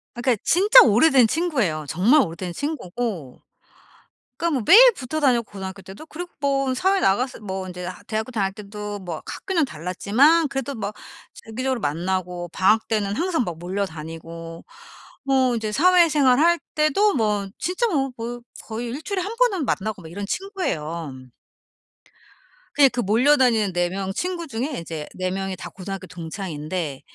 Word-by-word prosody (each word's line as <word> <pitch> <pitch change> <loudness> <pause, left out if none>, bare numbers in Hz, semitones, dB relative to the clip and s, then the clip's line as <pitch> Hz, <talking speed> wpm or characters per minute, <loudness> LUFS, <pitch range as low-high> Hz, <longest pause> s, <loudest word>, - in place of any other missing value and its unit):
그니까 240 0 +1
진짜 415 +8 +7
오래된 250 +2 +5
친구예요. 235 - -1
정말 220 - +4
오래된 175 -3 -4
친구고 225 - -4 1.0
그러니까 335 +2 0
뭐 250 - 0
매일 - - +9
붙어 310 0 -4
다녔고 245 -7 +1
고등학교 190 0 -7
때도 195 +12 -11
그리고 350 +3 -8
뭐 275 -2 +1
사회 380 +7 +2
나가서 245 - +1
뭐 190 -2 -5
이제 180 0 -7
아 185 - -8
대학교 220 +3 -3
다닐 195 -4 -1
때도 210 0 -7
뭐 175 -4 -6
학교는 365 -5 -1
달랐지만 245 - +2
그래도 270 0 -4
뭐 210 -2 -4 0.4
주기적으로 255 +2 -4
만나고 175 +3 -2
방학 205 +6 +2
때는 205 -2 0
항상 335 - 0
막 170 -4 -6
몰려 190 +4 -2
다니고 165 +1 -9 0.6
어 260 -2 +3
이제 220 -1 -3
사회생활 305 -5 +4
할 340 +2 +4 0.2
때도 310 +8 +3
뭐 210 -4 0
진짜 370 +7 0
뭐 270 -8 0
뭐 240 +1 -5 0.2
거의 230 +2 -5
1 255 +5 -5
주일에 380 +2 -2
1 405 - -4
번은 420 -10 +2
만나고 205 -1 -2
막 160 - -11
이런 200 +3 -5
친구예요. 170 - -3 1.6
그냥 280 -2 +6
그 245 - -3
몰려 240 +8 +3
다니는 225 -7 +2
4 175 0 +1
명 190 +1 -4
친구 345 - -3
중에 260 - -3
이제 160 -2 -6
4 185 0 -2
명이 195 0 -3
다 - - -8
고등학교 195 0 -7
동창인데 165 -3 -5
220 Hz, 325 characters per minute, -23 LUFS, 185-285 Hz, 1.6 s, 매일